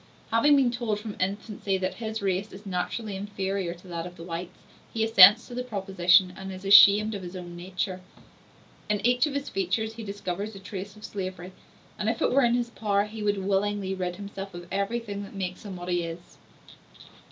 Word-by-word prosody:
Having 260 +6 +5
been 265 -3 +3
told 235 -4 -2
from 210 -1 -7
infancy 200 +1 -2
that 185 0 -2
his 220 -2 -5
race 195 +2 -1
is 200 +2 -12
naturally 195 +3 -3
inferior 195 -2 -3
to 175 +2 -17
that 170 -1 -4
of 180 - -12
the 165 - -9
whites, 170 +1 -6 0.3
he 225 - 0
assents 220 0 +8
to 245 - -10
the 250 +1 -3
proposition 190 -4 +3
and 190 0 -7
is 185 +1 -9
ashamed 205 +2 +8
of 200 - -5
his 180 0 -8
own 175 -1 -8
nature. 185 +1 -4 0.9
In 210 -1 +1
each 245 +4 +4
of 285 - -5
his 280 0 -2
features 195 +4 -1
he 225 0 -8
discovers 200 0 -4
a - - -8
trace 195 +1 -7
of 215 - -10
slavery, 185 -2 -6 0.5
and, 215 - 0
if 225 - -1
it - - +2
were 275 +1 +4
in 240 0 +3
his 240 -1 -1
power, 205 -3 +1
he 215 +1 -8
would 205 -2 0
willingly 200 0 0
rid 180 -2 -3
himself 195 -1 -7
of 175 0 -8
everything 200 +1 -2
that 200 0 -9
makes 185 0 -5
him 195 -2 -6
what 175 0 -8
he 175 -1 +1
is. 170 +1 -9
200 Hz, 205 wpm, -27 LUFS, 185-215 Hz, 0.9 s, assents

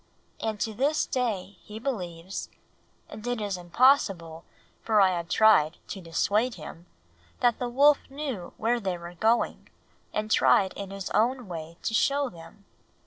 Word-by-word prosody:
And 220 -2 -3
to 220 - -1
this 280 +7 +1
day 205 -7 -2
he 210 - -10
believes 185 -7 -5 0.6
and 215 +3 -9
it 245 -1 -1
is 205 -2 -2
impossible, 175 - +2 0.4
for 220 -2 +2
I 195 -2 +6
have 170 -1 -3
tried, 180 -8 +4
to 195 - -6
dissuade 210 +8 0
him 165 +1 -10 0.5
that 240 -2 +3
the 245 - -2
wolf 285 +4 +5
knew 270 -10 -5
where 235 +2 +1
they 190 -5 -2
were 170 0 -9
going 220 +7 0 0.4
and 215 0 -3
tried 190 -3 +4
in 200 -1 -7
his 195 -1 -6
own 240 +3 +1
way 165 -1 -7
to 225 - -1
show 280 +4 +2
them. 175 +3 -14
210 Hz, 155 wpm, -27 LUFS, 175-245 Hz, 0.6 s, I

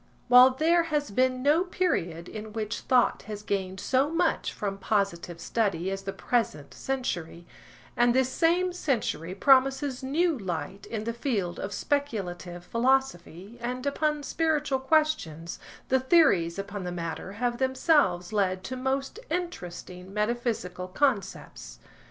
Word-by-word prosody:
While 250 +1 +9
there 335 +4 +3
has 295 -6 -1
been 255 +3 +1
no 300 +5 +4
period 180 - -1
in 215 0 -8
which 215 -1 -3
thought 250 -2 +2
has 210 -1 -6
gained 190 -2 -2
so 265 +7 +1
much 330 +2 0
from 195 -1 -4
positive 190 -4 -1
study 190 -4 -1
as 195 0 -3
the 195 0 -4
present 195 - -2
century, 175 -11 -4 0.5
and 240 0 +3
this 260 -1 +3
same 350 +5 +2
century 225 - -2
promises 270 +3 +3
new 315 +5 +1
light 190 - -5
in 220 -2 -4
the 230 +1 -2
field 215 -8 -2
of 195 - -4
speculative 185 -12 -3
philosophy 230 -4 -1
and 250 +2 -4
upon 300 +1 0
spiritual 300 -3 0
questions, 265 - 0 0.3
the 260 - +4
theories 255 - +4
upon 200 0 -5
the 180 - -4
matter 175 +2 -5
have 240 +3 -2
themselves 260 - +2
led 185 -3 0
to 260 - -5
most 270 - -2
interesting 180 - -5
metaphysical 210 -4 -2
concepts. 200 -1 -2
235 Hz, 135 wpm, -27 LUFS, 185-270 Hz, 0.5 s, While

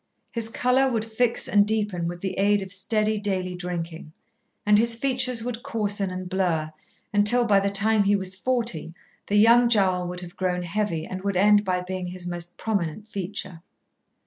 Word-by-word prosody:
His 230 -1 -1
colour 255 +3 +2
would 225 -2 -1
fix 225 +1 0
and 205 -1 +4
deepen 205 -5 -1
with 175 0 -6
the 190 - -3
aid 205 0 +3
of 190 0 -7
steady 215 +2 0
daily 190 -3 -2
drinking, 170 -3 -6 0.5
and 210 0 +5
his 230 +1 +1
features 255 -1 +1
would 240 -1 -4
coarsen 205 -4 -2
and 185 0 -6
blur, 170 -5 -1 0.4
until 210 +4 +4
by 205 -3 +4
the 200 0 0
time 205 +1 +2
he 205 +1 +3
was 190 -1 -1
forty 210 -7 -2 0.3
the 205 - 0
young 235 +3 +6
jowl 185 -5 +2
would 180 0 -6
have 175 +1 -10
grown 180 -2 -1
heavy 175 -3 -2
and 185 0 -6
would 200 -1 -1
end 205 +2 +5
by 185 -2 -1
being 185 0 -5
his 180 0 -6
most 175 0 -5
prominent 205 -1 -3
feature. 185 -3 -5
200 Hz, 180 wpm, -25 LUFS, 180-220 Hz, 0.5 s, young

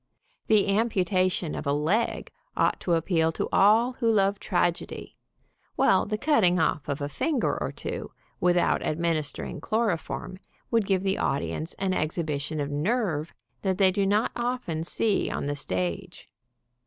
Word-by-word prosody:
The 210 -2 +4
amputation 185 -5 +1
of - - -5
a - - +2
leg 165 +11 0 0.3
ought - - +2
to 175 - 0
appeal 165 -1 +1
to - - -2
all 220 +5 +5
who 230 -3 +3
love 200 -1 +2
tragedy, 175 -2 -2 0.6
while - - +3
the 215 0 -1
cutting 215 - +3
off 155 -2 0
of 140 +1 -2
a 145 - -1
finger 270 - 0
or - - -2
two, - - -6 0.3
without 175 0 +2
ad 155 - -2
ministering 165 -3 -2
chloroform 205 -4 -2 0.3
would 225 -4 +2
give 190 -1 +1
the 195 0 0
audience 155 +4 -2
an 190 -1 -1
exhibition 155 -2 -2
of 145 0 -2
nerve 165 -1 -1 0.3
that 190 -2 0
they 190 -2 +4
do 195 0 0
not 210 +3 +2
often 240 -10 -2
see 205 +4 0
on - - -3
the 145 0 -2
stage. 90 -10 -4
185 Hz, 155 wpm, -26 LUFS, 155-210 Hz, 0.6 s, all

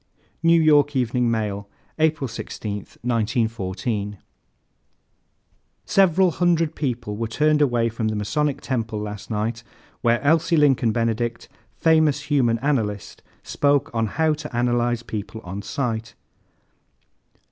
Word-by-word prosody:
New 165 +1 +5
York 150 -2 +4
Evening 125 -1 +1
Mail, 105 -3 -2 0.3
April 155 -3 +2
16, 110 -2 -5 0.3
1914. 110 -3 -1 1.7
"Several 190 -3 +4
hundred 165 -2 +1
people 120 -7 -3
were 115 +2 -2
turned 150 +6 +2
away 120 -5 +2
from 115 -1 -2
the 110 - -1
Masonic 140 +7 -1
Temple 115 -4 -2
last 105 -1 -6
night 110 +1 -2 0.4
where 120 -1 +3
Elsie 165 +3 +3
Lincoln 135 -6 +3
Benedict, 115 +1 -1 0.3
famous 155 -3 +3
human 120 -5 +3
analyst, 110 -9 -1 0.2
spoke 145 -1 +1
on 115 -1 0
'How 155 +8 +1
to 150 -5 -7
Analyze 120 -1 +1
People 110 0 -6
on 95 +3 -6
Sight.' 115 -1 -3
120 Hz, 115 wpm, -23 LUFS, 110-150 Hz, 1.7 s, New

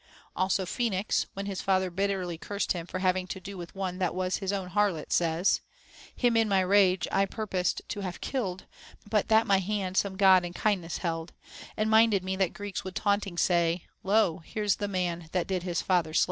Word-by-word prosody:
Also 185 0 +1
Phoenix, 210 -1 0
when 195 0 -4
his 195 -2 -4
father 190 -1 +1
bitterly 190 -2 -1
cursed 200 +5 -3
him 170 -2 -2
for 185 - -4
having 185 0 +1
to 190 - -5
do 195 +2 -8
with 175 -1 -9
one 185 -1 -3
that 180 -2 0
was 185 0 0
his 195 -1 -2
own 195 -3 -3
harlot, 200 -6 0
says, 170 +2 +2 0.5
Him 240 -2 +2
in 225 -1 +3
my 195 -1 +3
rage 185 -1 +3
I 195 0 +2
purposed 190 -4 -2
to 205 - -4
have 185 -3 -5
killed, 195 -9 -3 0.4
But 210 -1 +1
that 220 0 +4
my 200 -3 +4
hand 190 -1 -2
some 200 -1 +1
God 190 -2 +6
in 175 0 -5
kindness 180 -5 -1
held; 165 -1 -3 0.4
And 215 - +1
minded 220 -3 +4
me 190 0 -2
that 190 -2 +1
Greeks 205 -2 -5
would 190 -1 -7
taunting 200 -3 0
say, 170 -1 +2 0.2
Lo, 195 -4 +2
here's 205 +5 -1
the 205 - -2
man 175 -4 -2
that 180 -2 +1
did 185 -2 -2
his 175 -1 -2
father 170 -4 +1
slav. - - +5
190 Hz, 200 wpm, -28 LUFS, 180-200 Hz, 0.5 s, God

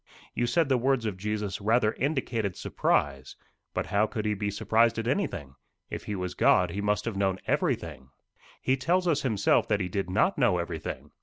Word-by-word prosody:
You 120 - 0
said 160 +6 +2
the 130 -2 +2
words 130 -1 +1
of 105 -3 -2
Jesus 105 0 -3
rather 110 +1 +2
indicated 125 - -1
surprise. 70 -2 -1 0.4
But - - -2
how 105 +1 +2
could 110 -1 -4
he 105 - +1
be 105 0 -2
surprised 115 +3 +2
at 115 0 -2
anything? 120 - -2 0.4
If - - -5
he 105 - -3
was 90 -1 -3
God, 90 -2 +3
he 100 +3 -3
must 105 0 0
have 115 -3 -3
known 95 -1 +1
everything." 65 -5 -1 0.5
"He 130 +1 +2
tells 180 +7 +1
us 155 -4 +2
himself 110 -6 +2
that 105 -2 +1
he 90 -2 -2
did 95 0 -2
not 110 - +2
know 120 -9 +3
everything. 85 -2 -5
105 Hz, 195 wpm, -28 LUFS, 95-125 Hz, 0.5 s, God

